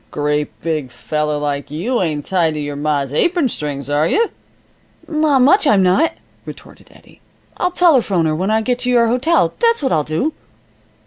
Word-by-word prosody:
"A - - -37
great 150 0 -2
big 155 -5 -2
feller 150 +3 -3
like 145 -1 -3
you 190 - -2
ain't 150 -5 -2
tied 170 -4 0
to - - -4
your 145 -1 -4
ma's 145 -2 -2
apron 340 - +2
strings 145 - -4
are 145 +2 +1
you?" 455 +1 +1 0.8
"Not 305 -4 +2
much 350 +5 +4
I'm 200 -7 +4
not!" 185 - +2 0.3
retorted - - -13
Eddie. - - -21 0.4
"I'll 360 - 0
telephone 260 - +2
her 155 - 0
when 185 +5 -2
I 220 +1 +2
get 245 +2 -1
to 250 - -2
your 240 -2 +4
hotel, 260 +8 +1
that's 465 -7 +2
what 265 - 0
I'll 155 - +1
do." 160 - -2
180 Hz, 185 wpm, -17 LUFS, -, 0.8 s, much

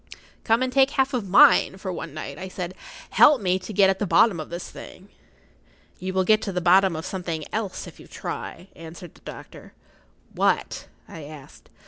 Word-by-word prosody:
"[Pg - - -14
50] - - -23 0.2
"Come 225 +1 +3
and 255 -1 -3
take 270 -1 +4
half 270 0 0
of 225 -7 -3
mine 190 0 +6
for 190 -1 -5
one 165 - -6
night," 145 -1 -7
I 190 - -6
said. 185 -1 -6 0.4
"Help 295 -3 +6
me 185 -2 0
to 185 +3 -9
get 200 -1 +4
at 190 0 0
the 205 - -1
bottom 195 -1 +4
of 155 - -7
this 170 +1 -6
thing." 190 +2 -12 0.9
"You 185 +1 -4
will 190 0 +1
get 215 +3 +3
to 210 - -4
the 180 - -1
bottom 185 +1 +4
of 160 - -5
something 170 -5 -4
else 210 -3 -3
if - - -13
you - - -14
try," 180 +3 -7
answered 165 +1 -11
the - - -22
doctor. - - -11 0.6
"What?" - - -1 0.2
I 160 -3 -10
asked. 145 -2 -13
185 Hz, 205 wpm, -24 LUFS, 170-205 Hz, 0.9 s, mine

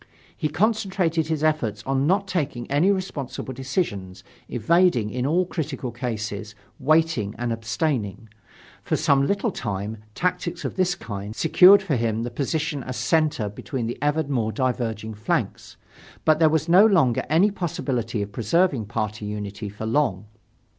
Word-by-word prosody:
He 155 - -1
concentrated 185 -3 +1
his 155 -1 -1
efforts 120 -10 0
on 135 +1 +1
not 195 +3 +2
taking 145 -10 -2
any 150 +7 +3
responsible 155 -9 -3
decisions, 100 - -3 0.3
evading 125 - +2
in 125 +1 -1
all 175 +5 +2
critical 145 -7 -4
cases, 110 -3 -4 0.2
waiting 155 -7 +2
and 120 0 -1
abstaining. 115 - -2 0.5
For - - -1
some 140 -3 +3
little 200 +2 0
time, 105 - -4 0.2
tactics 175 -1 -2
of - - -3
this 185 -1 +1
kind 105 - -7
secured 190 +6 +7
for 165 -7 0
him 115 -1 -1
the 120 - -4
position 145 +3 -2
as 130 -1 -6
center 150 -3 +1
between 115 +4 -5
the 120 - -4
ever 150 +2 +1
more 125 -6 -1
diverging 115 -4 -2
flanks. 105 +1 -3 0.5
But 155 0 +4
there 160 -2 +6
was 160 +1 0
no 180 +4 +7
longer 165 - +3
any 175 +7 +4
possibility 125 - -2
of 100 - -8
preserving 125 - +1
party 110 0 -3
unity 105 0 -5
for 105 +2 -7
long. 110 -5 0
135 Hz, 150 wpm, -24 LUFS, 110-165 Hz, 0.5 s, secured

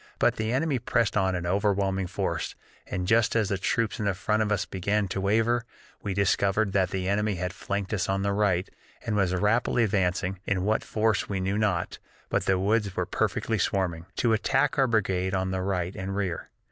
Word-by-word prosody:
But - - +2
the 110 0 -1
enemy 135 +1 +1
pressed 120 -1 +1
on 95 -2 +2
in 85 -1 -3
overwhelming 95 0 +1
force, - - -2 0.3
and 90 0 -3
just 115 +3 +3
as 110 -3 +2
the 100 - 0
troops 115 +3 0
in 100 -2 +1
front 105 +4 0
of 105 -1 0
us 105 -2 +1
began 100 +2 -1
to 95 - -2
waver, 115 +4 +2 0.4
we 100 -2 -3
discovered 100 +1 +2
that 95 -2 +2
the 95 -1 -2
enemy 105 +1 +1
had 90 0 -3
flanked 100 +2 -3
us 95 -3 -1
on 95 0 0
the 100 0 +1
right 100 -3 +1 0.4
and 110 -3 -1
was 95 -3 +2
rapidly 115 +5 +2
advancing 95 -2 0
(in 100 -2 -1
what 110 +1 +1
force 110 -2 0
we 100 -2 -1
knew 95 +2 -1
not, 95 -5 0 0.3
but - - 0
the 95 - +3
woods 100 0 +1
were - - 0
perfectly - - -1
swarming), 90 -4 -1
to 115 -2 +2
attack 135 +6 +2
our 135 - +5
brigade 95 -4 +1
on 95 0 -1
the 95 0 -1
right 90 -1 -2
and 95 +1 -4
rear. 95 -4 -3
100 Hz, 200 wpm, -27 LUFS, 95-110 Hz, 0.4 s, our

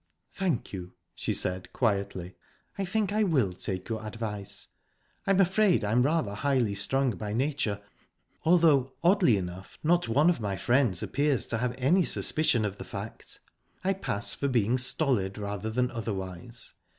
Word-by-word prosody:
"Thank 175 - -2
you," 90 -2 -7 0.2
she - - -3
said 90 0 -2
quietly. 100 -5 -1 0.4
"I 195 - -2
think 205 +1 -1
I 215 - +2
will 135 - +2
take 95 0 -5
your 110 -1 -4
advice. 105 -2 -5 0.6
I'm 195 -1 +3
afraid 190 - +3
I'm 110 +4 +2
rather 140 -6 +1
highly 125 -2 +1
strung 130 +6 +3
by 105 -2 -5
nature, 130 -4 -1 0.6
although, 155 -6 +4
oddly 175 - +4
enough, 90 0 -7
not 170 -2 +2
one 145 +9 +4
of 170 - -3
my 100 -3 -2
friends 120 -7 +2
appears 145 -3 0
to 115 - -2
have 125 +1 -1
any 160 +9 +3
suspicion 140 -9 +3
of 100 -1 -4
the - - -5
fact. - - -8 0.4
I 190 +1 +2
pass 105 - -2
for 140 - -1
being 120 -1 +2
stolid, 125 -7 +1
rather 105 0 -4
than 125 +3 0
otherwise. 105 0 -6
120 Hz, 155 wpm, -28 LUFS, 100-155 Hz, 0.6 s, although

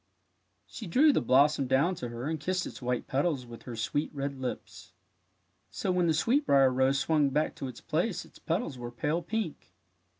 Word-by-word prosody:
" - - -46
She 220 - -8
drew 285 - +5
the - - +2
blossom 135 +3 +3
down 135 +8 +3
to 120 - -3
her 120 +3 -5
and 160 0 -2
kissed 180 +4 -1
its - - -8
white 125 0 -1
petals 140 -1 0
with 120 -1 -11
her 120 - -6
sweet 145 +7 -1
red 140 -1 -3
lips. 130 -1 -6 0.8
So 185 - -2
when 180 -1 +2
the 160 - +2
sweetbrier 150 - +3
rose 130 +2 +2
swung 150 0 +2
back 150 +3 0
to 135 - -4
its 125 -2 -9
place 175 +6 -1
its - - -18
petals 165 - -2
were 120 0 -5
pale 150 +8 -1
pink. 200 -2 -4
145 Hz, 195 wpm, -29 LUFS, 130-170 Hz, 0.8 s, drew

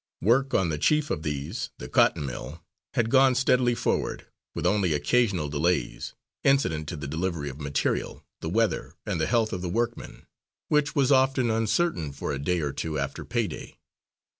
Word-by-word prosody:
Work 130 +7 +3
on 90 -3 +2
the 75 -2 -2
chief 150 - +2
of 75 - -1
these, 75 - -3
the - - -7
cotton 75 - +3
mill, 75 +5 -7 0.3
had 120 -3 +1
gone 130 -1 +5
steadily 125 -1 +3
forward, - - -1 0.3
with - - -3
only 95 -3 +2
occasional 90 +2 +1
delays, 80 +5 -1 0.3
incident 110 - +2
to - - -4
the 75 - -6
delivery 80 0 -2
of 65 - -12
material, 70 0 -2
the 80 - -4
weather, 110 +2 0
and - - -2
the - - +1
health 115 -2 +1
of 90 - -3
the 90 - -3
workmen, 115 +5 -3 0.4
which 150 +1 +2
was 140 -2 +3
often 130 -3 +3
uncertain 110 - 0
for 70 - -4
a 70 - -3
day 85 +4 0
or 70 -2 -2
two 80 -2 -3
after 70 0 -3
pay 120 -1 0
day. 85 - -8
95 Hz, 180 wpm, -26 LUFS, 75-125 Hz, 0.4 s, gone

